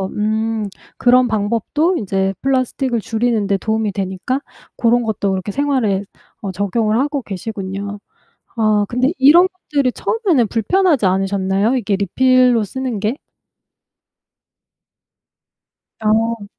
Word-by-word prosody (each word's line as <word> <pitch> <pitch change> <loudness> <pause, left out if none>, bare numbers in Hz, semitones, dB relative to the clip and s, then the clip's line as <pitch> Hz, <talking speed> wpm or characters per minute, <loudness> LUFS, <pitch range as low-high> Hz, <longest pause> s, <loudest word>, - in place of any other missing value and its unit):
음 220 0 -1 0.3
그런 250 0 +4
방법도 235 - 0
이제 195 -1 -1
플라스틱을 260 -2 0
줄이는 225 0 0
데 200 -1 +1
도움이 220 +1 -1
되니까 195 +7 -3 0.4
고런 240 0 +3
것도 205 -3 -1
그렇게 190 +2 -3
생활에 245 -7 0 0.4
어 200 - -4
적용을 215 +4 0
하고 285 0 -1
계시군요. 200 0 -5 0.6
아 215 -2 +2
근데 255 +5 +1
이런 325 +7 +6
것들이 290 -8 -2
처음에는 355 - +1
불편하지 285 - +1
않으셨나요? 195 +4 +1
이게 210 -4 0
리필로 250 +4 +3
쓰는 250 0 -4
게? 215 +5 -1 2.9
어. 220 0 +1
225 Hz, 265 characters per minute, -18 LUFS, 200-255 Hz, 2.9 s, 이런